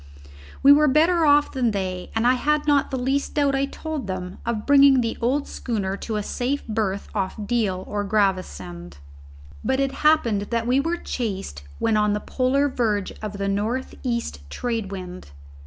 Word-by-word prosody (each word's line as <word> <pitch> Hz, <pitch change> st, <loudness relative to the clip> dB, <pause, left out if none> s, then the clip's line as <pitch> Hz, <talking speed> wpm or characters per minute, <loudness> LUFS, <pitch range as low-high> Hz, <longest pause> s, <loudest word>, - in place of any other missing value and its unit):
We 275 Hz, -, +8 dB
were 300 Hz, +1 st, +6 dB
better 320 Hz, +3 st, +4 dB
off 290 Hz, 0 st, +4 dB
than 255 Hz, -4 st, +1 dB
they, 185 Hz, -3 st, -3 dB
and 225 Hz, +1 st, +1 dB
I 250 Hz, -, +5 dB
had 295 Hz, +4 st, +1 dB
not 290 Hz, -2 st, +3 dB
the 265 Hz, -, -2 dB
least 270 Hz, +4 st, -1 dB
doubt, 285 Hz, -2 st, +2 dB
I 270 Hz, 0 st, +1 dB
told 305 Hz, -5 st, -5 dB
them, 185 Hz, -1 st, -5 dB
of 225 Hz, -3 st, -2 dB
bringing 275 Hz, -2 st, +6 dB
the 230 Hz, -1 st, -2 dB
old 270 Hz, +5 st, 0 dB
schooner 200 Hz, -5 st, -3 dB
to 220 Hz, -, -4 dB
a 210 Hz, -, -1 dB
safe 255 Hz, +6 st, -2 dB
berth 210 Hz, -3 st, -2 dB
off 195 Hz, -3 st, -2 dB
Deal 200 Hz, -5 st, 0 dB
or 205 Hz, 0 st, -2 dB
Gravesend. 185 Hz, -, -2 dB, 0.7 s
But 265 Hz, -, 0 dB
it 275 Hz, -1 st, +1 dB
happened 235 Hz, -10 st, +3 dB
that 230 Hz, -1 st, -1 dB
we 250 Hz, +3 st, +3 dB
were 330 Hz, +4 st, -1 dB
chased 195 Hz, -, -4 dB, 0.2 s
when 225 Hz, -1 st, +1 dB
on 210 Hz, -1 st, +2 dB
the 210 Hz, -, -1 dB
polar 265 Hz, +5 st, +1 dB
verge 220 Hz, -7 st, -1 dB
of 210 Hz, -1 st, -5 dB
the 200 Hz, 0 st, -2 dB
North 215 Hz, +6 st, -2 dB
East 235 Hz, -, -2 dB
Trade 225 Hz, -, -3 dB
wind. 180 Hz, -, -8 dB
230 Hz, 180 wpm, -23 LUFS, 200-275 Hz, 0.7 s, We